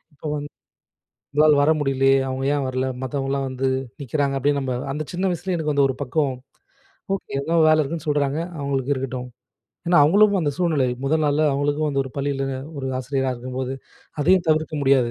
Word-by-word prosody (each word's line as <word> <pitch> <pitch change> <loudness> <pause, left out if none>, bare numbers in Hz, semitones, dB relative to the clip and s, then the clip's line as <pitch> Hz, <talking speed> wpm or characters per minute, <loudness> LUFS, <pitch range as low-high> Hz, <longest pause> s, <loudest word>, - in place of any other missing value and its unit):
இப்ப - - -33
வந்து 145 0 -5 0.8
உங்களால 150 0 +5
வர 150 - +4
முடியலையே 135 -1 +3
"அவங்க 130 +1 -3
ஏன் 140 -2 0
வரலை 130 0 -1
மத்தவங்கலாம் 135 +1 -2
வந்து 130 +1 -2 0.4
நிக்கிறாங்க" 140 +1 -1
அப்டின்னு, 140 +1 +1
நம்ம 130 -2 -2 0.2
அந்த 150 +2 -3
சின்ன 185 +2 -2
வயசுல 180 +2 -3
எனக்கு 155 -2 -1
வந்து 140 -1 +4
ஒரு 130 - -3
பக்கம் 140 +1 0 0.8
ஓகே - - -10
எதோ 165 +4 -1
வேலை 155 0 +5
இருக்குன்னு 160 +2 -4
சொல்தாங்க, 145 +1 +1 0.2
அவங்களுக்கு 140 0 -1
இருக்கட்டும் 130 -1 -4 0.6
ஏன்னா 175 -1 +5
அவங்களும் 200 +6 +5
அந்த 145 - +1
சூழ்நிலை 155 -7 +2 0.2
முதல் 155 +3 +1
நாள்ல 145 +2 +2
அவங்களுக்கும், 145 +2 0
அந்த 140 - -1
ஒரு 135 - -8
பள்ளியில 140 -1 -1 0.3
ஒரு 135 - -3
ஆசிரியரா 135 0 -1
இருக்கும்போது 130 +1 -4 0.5
அதையும் 180 +3 +3
தவிர்க்க 155 0 0
முடியாது. 135 -3 +3
140 Hz, 170 wpm, -22 LUFS, 135-155 Hz, 0.8 s, உங்களால